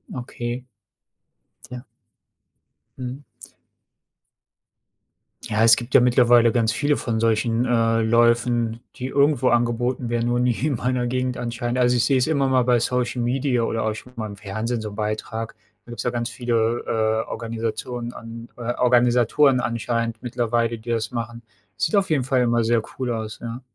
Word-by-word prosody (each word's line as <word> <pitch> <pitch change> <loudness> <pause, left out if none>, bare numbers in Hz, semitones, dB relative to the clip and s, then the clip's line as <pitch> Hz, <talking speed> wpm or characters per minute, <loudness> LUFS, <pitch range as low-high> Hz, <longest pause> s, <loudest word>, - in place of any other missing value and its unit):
Okay. 120 0 -5 1.1
Ja. 125 +1 -8 1.1
Mhm. 130 +2 -6 2.3
Ja, 110 +1 +2
es 115 - +8
gibt 120 +1 -5
ja 125 - +8
mittlerweile 120 -1 +5
ganz 115 -2 +1
viele 145 +4 +1
von 115 -2 -2
solchen, 115 +1 +1
äh, 115 -2 +2
Läufen, 120 0 +2 0.2
die 130 - -4
irgendwo 140 -1 +2
angeboten 120 +1 0
werden, 120 0 0
nur 120 0 +1
nie 125 -1 +2
in 140 - 0
meiner 125 +1 -1
Gegend 125 0 -1
anscheinend, 120 +1 -3
also, 125 0 +3
ich 120 - +2
sehe 135 -2 +3
es 125 - +1
immer 140 -4 +1
mal 130 -1 +3
bei 125 -1 +3
Social 125 +1 -1
Media 125 -1 0
oder 115 -1 -1
auch 110 -1 -1
schon 125 +3 -12
mal 110 -1 -3
im 100 - -8
Fernsehen 110 +3 -3
so 105 - -5
'n 100 - -10
Beitrag. 110 +1 -4 0.3
Da - - -17
gibt's 120 - -5
ja 125 - 0
ganz 120 -1 -2
viele, 120 -1 0
äh, 110 0 0
Organisationen 115 +1 -4
an 115 +1 -10
äh, 120 0 -3
Organisatoren 125 +2 +4
anscheinend 115 0 -2
mittlerweile, 120 -1 -1
die 120 +2 -6
das 115 -1 -1
machen, 115 0 -5 0.3
sieht 215 - 0
auf 195 -4 +2
jeden 135 -5 +2
Fall 130 -1 +1
immer 120 -1 +2
sehr 115 0 +2 0.2
cool 125 -1 -1
aus, 110 -2 -5
ja. 120 +2 -6
120 Hz, 165 wpm, -23 LUFS, 115-125 Hz, 2.3 s, es